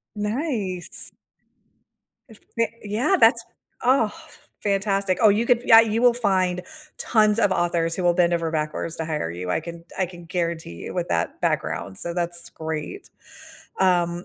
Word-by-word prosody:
Nice. 210 Hz, -, -3 dB, 1.2 s
If 220 Hz, -, -15 dB, 0.2 s
they 230 Hz, -1 st, 0 dB
Yeah, 245 Hz, -, +1 dB
that's 230 Hz, 0 st, +5 dB, 0.4 s
Oh, 255 Hz, -5 st, +4 dB, 0.5 s
fantastic. 195 Hz, -2 st, 0 dB
Oh, 215 Hz, -, +7 dB
you 215 Hz, +4 st, +2 dB
could 240 Hz, -1 st, +3 dB
Yeah, 225 Hz, 0 st, +9 dB
you 225 Hz, +1 st, 0 dB
will 245 Hz, -1 st, +6 dB
find 185 Hz, -6 st, +1 dB, 0.3 s
tons 215 Hz, -1 st, +3 dB
of 205 Hz, -3 st, +3 dB
authors 170 Hz, -2 st, +1 dB
who 185 Hz, -, -3 dB
will 175 Hz, 0 st, +4 dB
bend 175 Hz, -1 st, +2 dB
over 165 Hz, -1 st, 0 dB
backwards 155 Hz, +1 st, -2 dB
to 160 Hz, -, -3 dB
hire 150 Hz, -, -2 dB
you, 90 Hz, +1 st, -6 dB
I -, -, +1 dB
can 170 Hz, 0 st, -9 dB
I 190 Hz, -, +1 dB
can 175 Hz, -1 st, -12 dB
guarantee 170 Hz, -, -3 dB
you, -, -, -6 dB
with 175 Hz, -1 st, -2 dB
that 85 Hz, -, -1 dB
background, 95 Hz, -1 st, -2 dB
so 170 Hz, -, -3 dB
that's 175 Hz, -1 st, -1 dB
great, 160 Hz, -, -6 dB, 0.7 s
um, 175 Hz, -1 st, +2 dB
185 Hz, 160 wpm, -23 LUFS, 170-220 Hz, 1.2 s, Yeah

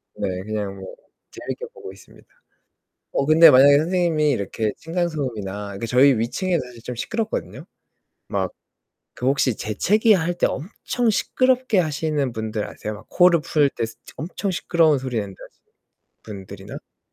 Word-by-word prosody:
네, -, -, -2 dB, 0.2 s
그냥 105 Hz, -2 st, -4 dB
뭐 95 Hz, -1 st, -9 dB, 0.4 s
재밌게 485 Hz, -, -6 dB
보고 425 Hz, -4 st, -10 dB
있습니다. -, -, -18 dB, 0.9 s
어 140 Hz, -, +1 dB
근데 155 Hz, +3 st, +8 dB
만약에 140 Hz, +2 st, +7 dB
선생님이 160 Hz, -2 st, +1 dB
이렇게 110 Hz, -2 st, -2 dB
층간 170 Hz, +2 st, -2 dB
소음이나 105 Hz, -, -5 dB
그 115 Hz, -, -4 dB
저희 130 Hz, +2 st, +5 dB
위층에 165 Hz, +10 st, -1 dB
사실 125 Hz, -2 st, -9 dB
좀 125 Hz, -, -5 dB
시끄럽거든요. 225 Hz, -, -4 dB, 0.6 s
막 95 Hz, -2 st, -1 dB, 0.7 s
그 125 Hz, -, -3 dB
혹시 135 Hz, -3 st, +2 dB
재채기할 180 Hz, -, +2 dB
때 175 Hz, -, +1 dB
엄청 230 Hz, -, -3 dB
시끄럽게 255 Hz, +1 st, +2 dB
하시는 150 Hz, -4 st, 0 dB
분들 110 Hz, -2 st, -3 dB
아세요? 105 Hz, -, -6 dB
막 105 Hz, -, -13 dB
코를 175 Hz, -2 st, +4 dB
풀 145 Hz, -3 st, +2 dB
때 115 Hz, -, -3 dB
스 115 Hz, 0 st, -12 dB, 0.2 s
엄청 185 Hz, +5 st, -4 dB
시끄러운 165 Hz, -4 st, +2 dB
소리 130 Hz, -3 st, -3 dB
낸다 100 Hz, -2 st, -7 dB
하시는 -, -, -20 dB, 0.6 s
분들이나. 100 Hz, -1 st, -9 dB
아 -, -, -14 dB
140 Hz, 330 characters per minute, -22 LUFS, 110-175 Hz, 0.9 s, 근데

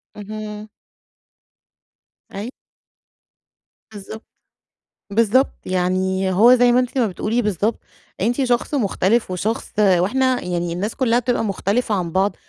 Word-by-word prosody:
اهم. 210 Hz, 0 st, -7 dB, 1.6 s
أي 205 Hz, +4 st, -5 dB, 1.4 s
بالضبط. 215 Hz, +2 st, -9 dB, 0.9 s
بالضبط، 230 Hz, +5 st, +3 dB
يعني 185 Hz, +1 st, 0 dB
هو 230 Hz, +7 st, +6 dB
زي 245 Hz, -1 st, +4 dB
ما 245 Hz, -, +4 dB
أنتِ 250 Hz, +1 st, -2 dB
ما 240 Hz, -3 st, +3 dB
بتقولي 215 Hz, +5 st, -1 dB
بالضبط، 210 Hz, +1 st, -1 dB, 0.4 s
أنتِ 240 Hz, +7 st, +1 dB
شخص 245 Hz, +3 st, 0 dB
مختلف 215 Hz, -3 st, +1 dB
وشخص 215 Hz, +5 st, -3 dB
وإحنا 215 Hz, +7 st, +2 dB
يعني 175 Hz, -1 st, -2 dB
الناس 200 Hz, +6 st, -3 dB
كلّها 240 Hz, -2 st, +2 dB
بتبقى 245 Hz, -1 st, -1 dB
مختلفة 210 Hz, +3 st, -1 dB
عن 175 Hz, -3 st, -2 dB
بعض، 195 Hz, +4 st, +1 dB
210 Hz, 115 wpm, -20 LUFS, 190-240 Hz, 1.6 s, هو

